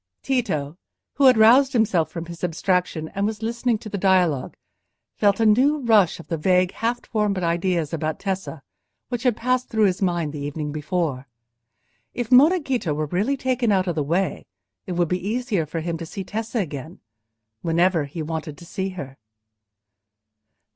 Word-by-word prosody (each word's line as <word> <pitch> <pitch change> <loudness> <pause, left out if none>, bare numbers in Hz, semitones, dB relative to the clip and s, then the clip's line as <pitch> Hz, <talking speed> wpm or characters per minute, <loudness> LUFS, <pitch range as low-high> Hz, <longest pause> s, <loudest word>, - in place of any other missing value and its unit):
Tito, 185 - -1 0.3
who 280 - +2
had 255 -3 +7
roused 255 +5 +6
himself 200 -9 +2
from 170 -1 -6
his 170 0 -10
abstraction, 175 -1 -1
and 200 +1 -1
was 220 0 -5
listening 235 +1 0
to 215 - -10
the 205 -1 -4
dialogue, 180 -8 +2 0.6
felt 200 0 +2
a 225 - +3
new 260 +8 +4
rush 220 - +3
of 170 - -11
the 165 -2 -3
vague 180 +2 +3
half 235 +2 -2
formed 210 -3 0
ideas 170 -2 0
about 155 -1 -2
Tessa, 190 -7 -4 0.5
which 245 -2 -3
had 245 -4 +1
passed 255 +1 0
through 220 -2 +1
his 185 -1 0
mind 175 -5 0
the 150 - -5
evening 145 +1 -4
before: 150 -3 -2 0.9
if 240 -1 -3
Monna 300 +9 +6
Ghita 245 - -2
were 155 +1 -1
really 200 - 0
taken 255 -3 0
out 190 -2 +2
of 175 - -1
the 155 - -1
way, 170 +7 -1 0.4
it 185 - -3
would 175 -1 +1
be 180 +2 -2
easier 215 - -1
for 165 +2 -4
him 165 0 -3
to 165 - -5
see 195 - -6
Tessa 225 +5 -4
again—whenever 145 - -3
he 155 +3 -6
wanted 155 -1 -5
to 170 - -12
see 190 +3 -3
her. 135 -4 -7
185 Hz, 175 wpm, -23 LUFS, 160-225 Hz, 0.9 s, had